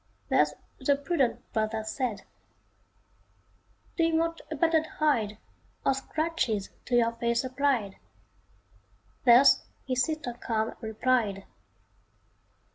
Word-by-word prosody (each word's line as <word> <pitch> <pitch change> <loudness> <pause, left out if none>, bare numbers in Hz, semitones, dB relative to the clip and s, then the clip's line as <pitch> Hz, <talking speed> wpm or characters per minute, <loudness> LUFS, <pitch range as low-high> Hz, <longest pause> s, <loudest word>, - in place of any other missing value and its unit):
Thus - - +3 0.2
the 285 - +2
prudent 280 -2 -1
brother 220 0 -1
said. 225 0 -3 1.7
"Do 335 - +3
you 330 0 +2
want 330 +1 0
a 315 - -3
battered 320 0 +2
hide, 230 -11 0 0.5
Or - - +4
scratches 270 -7 -2
to 245 - 0
your 230 -1 +4
face 235 +1 0
applied?" 255 -6 0 1.3
Thus 245 +2 +7 0.2
his 255 -1 0
sister 310 -6 -3
calm 225 -2 -2
replied. 220 -3 0
255 Hz, 105 wpm, -28 LUFS, 220-305 Hz, 1.7 s, Thus